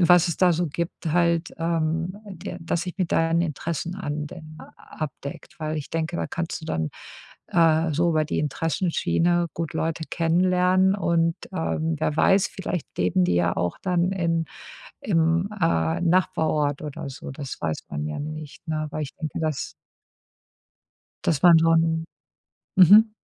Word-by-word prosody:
Was 175 0 +6
es 170 - -3
da 180 -2 +5
so 175 +1 0
gibt 165 +1 -4
halt, 170 -1 +2
ähm, 165 +2 -1
der 180 -2 -7
dass 165 0 -2
sich 180 0 -6
mit 185 -4 -1
deinen 165 +1 +3
Interessen 165 +2 -3
anwen 155 -1 -6 0.2
abdeckt, 140 -2 -7
weil 155 0 -2
ich 150 - -6
denke, 165 +1 -2
da - - -2
kannst 170 -1 -4
du - - -6
dann, 80 - -1 0.6
äh, 160 -2 +3
so 170 +2 +2
über 155 -1 +1
die - - -2
Interessenschiene 170 +2 +1
gut 165 -2 -3
Leute 160 0 -2
kennenlernen 180 +3 +3
und, 165 -4 +1 0.2
ähm, 160 -3 -1
wer 155 - 0
weiß, 190 +5 +4
vielleicht 180 -3 -4
leben 90 0 +2
die 90 0 +1
ja 85 - +1
auch 90 +1 -1
dann 180 0 +1
in 165 -3 0 0.6
im, 165 0 +2
äh, 80 - +1
Nachbarort 160 -5 +1
oder 150 0 -6
so. 135 - -8
Das 135 -1 -6
weiß 80 -2 -3
man 75 +1 -3
ja 75 - -4
nicht, 155 +1 -7
ne? 155 -1 -2
Weil 150 +1 -3
ich 140 - -8
denke, 155 -3 -5
dass 155 -3 -2 1.5
dass 150 -4 +1
man 170 -2 +8
so 165 0 +4
'n 165 0 +2 0.7
mhm. 210 +5 +8
165 Hz, 155 wpm, -24 LUFS, 155-175 Hz, 1.5 s, man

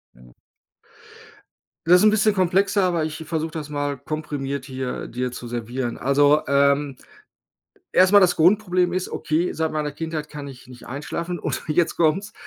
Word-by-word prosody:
Ja. 60 0 -18 1.6
Das 180 +1 +7
’n 215 - +7
bisschen 215 0 +3
komplexer, 195 +2 +2
aber 170 -3 +1
ich 160 +1 -6
versuche 160 0 -2
das 150 -2 -6
mal 145 -1 -2
komprimiert 140 -1 -4
hier 130 -2 -5
dir 125 +1 -3
zu 125 -1 -8
servieren. 120 +1 -4
Also, 145 +2 +3
ähm, 140 0 +2 1.0
erstmal 190 +2 +6
das 180 - +4
Grundproblem 180 0 +2
ist, 185 - -2
okay, 160 +3 -1
seit 160 0 -2
meiner 150 -2 -2
Kindheit 155 -1 -5
kann 145 -1 -7
ich 130 -1 -12
nicht 125 -2 -13
einschlafen 170 +6 -5
und - - -3
jetzt 165 +2 +1
kommt‘s, 170 +5 +1
155 Hz, 155 wpm, -22 LUFS, 140-175 Hz, 1.6 s, Das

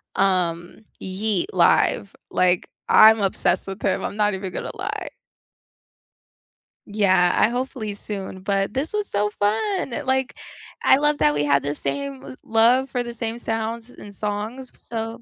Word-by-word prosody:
um, 180 +1 0
Yeat 195 0 -2
live. 185 +2 +3 0.2
Like, 180 -1 +1 0.2
I'm 220 0 +7
obsessed 190 -1 0
with 195 +1 -7
him, - - 0
I'm 205 - -4
not 210 -1 +2
even 190 -1 -5
gonna - - -4
lie. - - -4 1.8
Yeah, 190 -4 +3
I - - +5
hopefully 245 -3 -3
soon, 195 -2 -7
but 195 +1 -1
this 275 +4 -2
was 420 -1 -2
so 205 +1 0
fun! 255 - 0
Like, 265 0 0 0.5
I - - +6
love 295 +1 +1
that 150 - +4
we 145 0 0
have 140 -1 +2
the 145 +1 -2
same 140 -2 -4
love 240 +4 +3
for 245 0 -2
the 240 0 -7
same 230 0 -4
sounds 225 0 -3
and 205 -4 -12
songs, 215 +6 -4
so 225 0 -6
210 Hz, 150 wpm, -23 LUFS, 185-235 Hz, 1.8 s, I'm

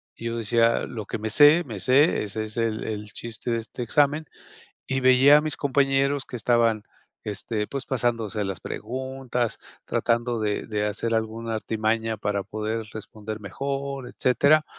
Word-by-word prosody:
y 115 - -9
yo 115 0 -2
decía: 115 +1 +2
"Lo 110 -4 -6
que - - -4
me 110 +1 -3
sé, 150 +6 +7
me 110 -6 -6
sé, 135 - +4
ese 110 +1 -3
es 110 - -7
el 115 -1 -1
el 105 -1 -5
chiste 120 +1 -5
de 115 - +1
este 115 +2 -8
examen", 145 +5 +2 0.6
y 130 0 0
veía 130 +3 +7
a - - +1
mis 155 -2 -1
compañeros 140 0 +1
que 125 - -6
estaban, 115 -1 +2 0.4
este, 105 +1 -2
pues, 135 +2 -5
pasándose 115 -4 0
las 95 -3 -4
preguntas, 130 0 -3 0.3
tratando 120 0 0
de 105 -1 -1
de 105 -1 -1
hacer 115 +2 -2
alguna 110 0 -2
artimaña 110 +1 -1
para 100 -1 -1
poder 110 +2 -3
responder 110 0 -7
mejor, 135 +5 -4
etcétera, 140 +5 +3
115 Hz, 160 wpm, -25 LUFS, 110-130 Hz, 0.6 s, sé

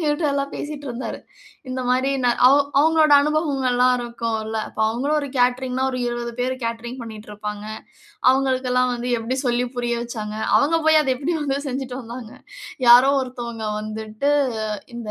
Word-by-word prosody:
எங்ககிட்ட 300 0 0
எல்லாம் 280 0 -1
பேசிட்டுருந்தாரு. 285 -4 -5 0.5
இந்த 255 0 -3
மாரி 255 +2 +2
நா 245 - +4 0.2
அவங் 280 +1 +4
அவங்களோட 315 0 +4
அனுபவங்கள்லாம் 270 -5 +2
இருக்கும்ல்ல. 230 -2 -3
அப்ப - - -17
அவங்களும் 275 +7 0
ஒரு 285 - -5
கேட்டரிங்ன்னா 250 +1 +1
ஒரு 255 - -4
20 240 0 -4
பேர் 255 +1 0
கேட்டரிங் 235 +2 -4
பண்ணிட்டு 215 -2 -9
இருப்பாங்க. 210 0 -6 0.7
அவங்களுக்கெல்லாம் 255 -1 +1
வந்து 245 +1 -4
எப்டி 230 +3 -3
சொல்லி 245 0 +1
புரிய 240 -1 -1
வச்சாங்க 215 -3 -5 0.2
அவங்க 320 +3 +2
போய் 315 0 +6
அத 270 -3 +1
எப்டி 295 +6 -2
வந்து 280 -2 -1
செஞ்சுட்டு 260 -1 -4
வந்தாங்க? 235 0 -9 0.5
யாரோ 245 +3 +8
ஒருத்தவங்க 235 -3 -5
வந்துட்டு 215 +5 -3 0.7
இந்த 230 -3 -6
250 Hz, 145 wpm, -22 LUFS, 235-275 Hz, 0.7 s, யாரோ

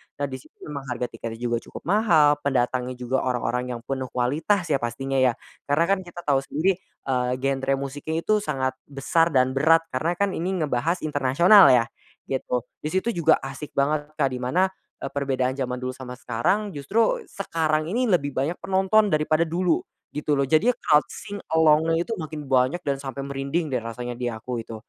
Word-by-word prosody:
Nah 145 - -2
di 130 - -5
situ - - -21
memang 140 -3 -7
harga 125 -1 -3
tiketnya 115 -1 -6
juga 120 0 -1
cukup - - -11
mahal, 160 -7 +4
pendatangnya 130 -2 0
juga 125 +1 -1
orang-orang 125 0 -1
yang 115 - -9
penuh 130 0 -3
kualitas 150 +12 0
ya 135 - +3
pastinya 135 +3 -2
ya, 125 -2 +3 0.3
karena 145 +4 +3
kan 195 - +3
kita 175 0 -9
tahu 140 -2 +2
sendiri, 165 +7 0 0.2
eee, 125 -2 0
genre 135 +1 0
musiknya 140 +3 -5
itu 215 0 +2
sangat 130 -8 -2
besar 145 +4 +1
dan 130 -5 +2
berat 160 +5 +4
karena 160 +7 -1
kan 200 +2 0
ini 180 0 -1
ngebahas 155 +6 -1
internasional 155 +7 +6
ya, 125 -2 +6 0.5
gitu. 125 -2 -1 0.2
Di - - -3
situ 190 +7 0
juga 165 -6 +3
asik 135 +2 -7
banget, 150 +1 +1
Kak, 140 -3 +2
di 125 - -4
mana, 145 +10 +2 0.4
eee, 135 - -4
perbedaan 135 -2 0
zaman 125 -2 -3
dulu 130 - -2
sama 125 -1 -8
sekarang, 180 - 0
justru 225 - +1
sekarang 155 -5 -1
ini 245 +2 +1
lebih 150 -7 +2
banyak 140 +6 -1
penonton 195 +3 +3
daripada 155 +1 +2
dulu, 170 +1 +1 0.3
gitu 150 0 -1
loh 140 - +2
jadi 160 - +3
loud 150 0 +3
sing 205 -1 -8 0.2
along-nya 160 +1 +4
itu - - -9
makin 155 -1 -6
banyak 135 +5 +1
dan 140 -1 -1
sampai 135 0 -5
merinding 140 +3 -2
deh 125 - +1
rasanya 120 +2 -6
di 120 0 -4
aku 120 +1 -4
itu. 115 0 -7
140 Hz, 185 wpm, -24 LUFS, 130-165 Hz, 0.5 s, internasional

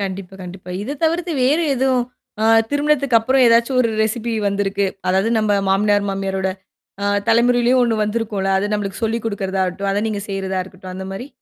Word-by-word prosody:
கண்டிப்பா, 195 -1 -5
கண்டிப்பா. 180 0 -9
இத 275 +7 -5
தவிர்த்து 335 +2 0
வேறு 295 +6 +3
எதுவும் 260 -1 +1 0.4
அ - - +2 0.3
திருமணத்துக்கு 285 -3 +2
அப்புறம் 260 +4 +2
ஏதாச்சும் 235 +3 +3
ஒரு 235 - +2
ரெசிபி 230 +2 -2 0.2
வந்திருக்கு. 200 0 0 0.2
அதாவது 190 +4 +2
நம்ம 210 -2 +2
மாமினியார், 205 +1 +2
மாமியாரோட 195 -1 -2 0.6
ஆ - - 0 0.2
தலைமுறையிலயும் 245 +2 +3
ஒண்ணு 235 -2 +1
வந்திருக்கும்ல. 210 -3 -2
அத 205 +2 -1
நம்மளுக்கு 200 -1 -3
சொல்லிக் 225 +1 -1
குடுக்குறதாாகட்டும். 195 -2 -2
அத 200 +1 0
நீங்க 210 -2 -3
செய்றதா 190 -1 -2
இருக்கட்டும் 185 0 -11
அந்த 190 0 -6
மாரி. 195 +7 -6
210 Hz, 165 wpm, -19 LUFS, 195-240 Hz, 0.6 s, வேறு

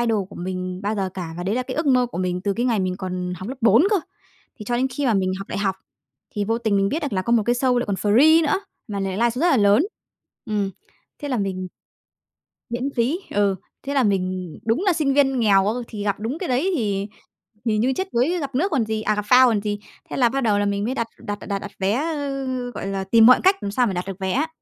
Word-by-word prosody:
idol 225 -5 +1
của - - -12
mình 185 0 -4
bao 210 +2 -1
giờ 195 -2 -1
cả, 170 -3 -5
và 175 - -4
đấy 195 +4 -1
là 255 - 0
cái - - -6
ước 315 0 -1
mơ 255 -2 +4
của 235 - -7
mình 180 -1 -1
từ 200 +2 0
cái 240 +5 -1
ngày 230 -5 +1
mình 185 -1 -1
còn 180 -1 -4
học 185 +4 -7
lớp 260 +1 -6
4 230 +2 +5
cơ. 420 - +4 0.6
Thì 215 - -9
cho 240 +3 -1
đến 255 +2 +1
khi 285 +1 -2
mà 235 - +3
mình 185 -1 +1
học 195 - -8
đại - - -3
học, 195 -2 0 0.5
thì 205 - -2
vô 225 +3 0
tình 220 -4 +1
mình 195 0 +2
biết 315 +9 -2
được 290 - -3
là 185 -2 0
có 235 - -1
một 235 -2 +4
cái 240 - +3
show 250 0 +2
lại 245 - -1
còn 200 - -1
free 270 - +5
nữa, 320 +5 +1 0.3
mà 200 -2 -3
lại 195 0 -2
liveshow 235 +2 +1
rất 350 +2 +4
là 275 - +4
lớn. 205 - +4 0.6
Ừm, 210 -4 -1 0.5
thế 290 - -5
là 255 -3 0
mình 185 -2 -3 1.0
Miễn 245 +3 -2
phí, 250 +8 +1
ừ. 200 -2 +1 0.3
Thế 280 +1 -4
là 275 - +3
mình 185 -5 -1
đúng 230 +9 +1
là 375 - +5
sinh 300 -5 +1
viên 270 -3 +3
nghèo 200 -3 +4
á, 215 - +1
thì 210 -3 -6
gặp 200 -1 -1
đúng 235 +8 -3
cái 365 - -4
đấy 265 +10 +1
thì 200 -5 -1 0.6
thì 220 -2 +1
như 250 +5 +2
chết 380 +8 -4
đuối 290 +10 +1
gặp 275 -4 -5
nước 365 +9 +1
còn 260 -7 +1
gì, 220 0 -2
à 215 0 +1
gặp 210 - -1
phao 255 +4 +7
còn 220 -4 +1
gì. 205 0 -2 0.3
Thế - - -4
là 245 -3 +4
bắt 270 +3 -1
đầu 210 -3 +2
là 205 - +1
mình 200 0 -1
mới 250 - -1
đặt 230 - -1
đặt 205 0 -5
đặt 200 -1 -1
đặt 200 - -8
vé, 195 +1 +1
ơ, 285 -2 -2 0.3
gọi 200 - -6
là, 195 -1 -2
tìm 220 +3 +5
mọi 250 +2 +8
cách 380 +2 +5
làm 200 - -2
sao 245 +4 +2
mà 200 - -2
đặt 180 +1 -3
được 195 0 -6
vé 190 -1 -1
á, 290 +9 +1
220 Hz, 275 wpm, -22 LUFS, 195-260 Hz, 1.0 s, mọi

